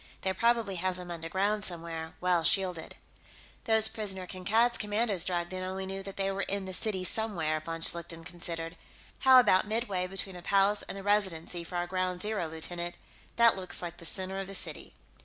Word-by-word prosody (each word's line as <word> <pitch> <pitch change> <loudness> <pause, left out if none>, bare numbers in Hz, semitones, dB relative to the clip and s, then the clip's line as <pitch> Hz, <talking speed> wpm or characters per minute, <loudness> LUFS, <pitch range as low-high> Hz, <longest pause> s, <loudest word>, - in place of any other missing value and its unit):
They 190 - 0
probably 230 -2 +1
have 185 +1 -1
them 180 -1 -8
underground, 190 +5 -1
somewhere, 165 -3 -5
well 180 -2 +2
shielded." 185 -4 0 0.7
"Those 220 -1 +6
prisoners 195 -4 -4
Kankad's 220 +6 +2
commandos 205 -3 +2
dragged 175 -1 -1
in 185 - -3
only 190 +1 -4
knew 195 0 -5
that 195 0 -8
they 195 0 +1
were 195 0 -2
in 195 0 -1
the 190 - -5
city 190 -1 +1
somewhere," 175 -6 0
von 165 +1 -6
Schlichten 165 0 +1
considered. 170 -1 -5 0.4
"How 260 -1 +8
about 210 -5 +4
midway 210 -5 -1
between 190 0 -5
the - - -9
Palace 200 +3 +4
and - - -6
the 195 - -7
Residency 185 -4 0
for 175 +2 -8
our 175 0 0
ground 185 0 -2
zero, 210 -5 -1
lieutenant? 170 +2 -5 0.4
That 235 -1 +6
looks 185 -1 -4
like 175 0 -5
the 170 - -9
center 190 +3 -3
of 195 - -4
the 195 - -6
city." - - -3
185 Hz, 190 wpm, -30 LUFS, 175-205 Hz, 0.7 s, How